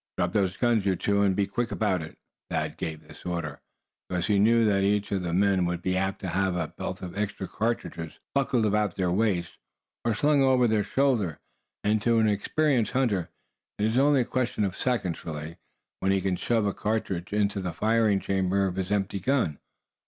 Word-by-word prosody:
"Drop 90 +1 0
those 95 -3 +1
guns, 120 -4 +2
you 95 -1 +2
two, 100 +2 +1
and 100 -2 +3
be 100 - +2
quick 115 +4 -2
about 95 -5 0
it!" 80 - -9 0.3
Thad - - -2
gave 80 -1 -5
this - - -15
order, 85 -4 -4 0.5
because 90 -1 -1
he 105 -2 +2
knew 115 +2 +5
that 100 -2 +3
each 100 +1 +1
of 100 -2 0
the 85 -1 -3
men 95 +1 +3
would 85 0 -3
be 90 0 0
apt 95 +1 -1
to 95 - -3
have 95 0 0
a 85 -3 -2
belt - - -6
of 90 0 -6
extra 100 -2 -3
cartridges 105 -8 -3 0.2
buckled 130 -4 +2
about 105 -3 +1
their 90 -2 0
waists, 90 -4 0 0.5
or 115 -2 +1
slung 145 +5 +3
over 130 -2 +4
their 110 -2 +2
shoulder. 110 - +1 0.4
And 105 0 +2
to 115 +1 +3
an 110 -1 +4
experienced 120 +4 +1
hunter, 110 -10 +1 0.5
it 105 - 0
is 110 +3 +2
only 140 -1 +4
a - - -1
question 125 -3 -1
of 95 -2 -1
seconds, 115 -10 -1
really, 80 +1 -6 0.4
when 95 - +1
he 95 - +3
can 95 0 0
shove 110 +4 0
a 100 - 0
single 110 +1 0
charge 90 -2 -5
into 100 -1 0
the 90 -2 -3
firing 110 0 +2
chamber 95 0 +1
of 95 -1 -3
his 95 +1 -2
empty 100 -1 0
gun. 110 - 0
100 Hz, 205 wpm, -27 LUFS, 90-115 Hz, 0.5 s, knew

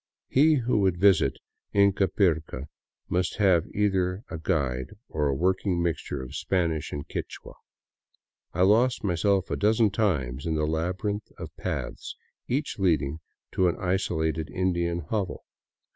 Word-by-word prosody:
He 155 +4 +5
who 120 -4 +1
would 95 -3 +2
visit 90 -8 +4 0.4
Ingapirca 95 -7 +2 0.4
must 90 0 -1
have 95 -6 +3
either 95 -1 0
a 80 - -4
guide 70 -4 -1
or 75 -1 0
a 70 - 0
working 90 +3 +1
mixture 85 -6 -2
of 65 +2 -9
Spanish 85 -3 -1
and 70 - -5
Quichua. - - -6 1.0
I 90 - +1
lost 115 +6 +3
myself 95 0 +1
a - - +1
dozen 110 0 +3
times 75 - -1
in 80 -1 0
a 75 - +1
labyrinth 90 +7 -2
of - - -8
paths, - - -4 0.3
each 140 -2 -2
leading 80 -5 +1 0.3
to 95 - +2
an 85 - +1
isolated 80 -4 -1
Indian 85 -2 0
hovel. 95 +3 -3
90 Hz, 135 wpm, -27 LUFS, 80-100 Hz, 1.0 s, He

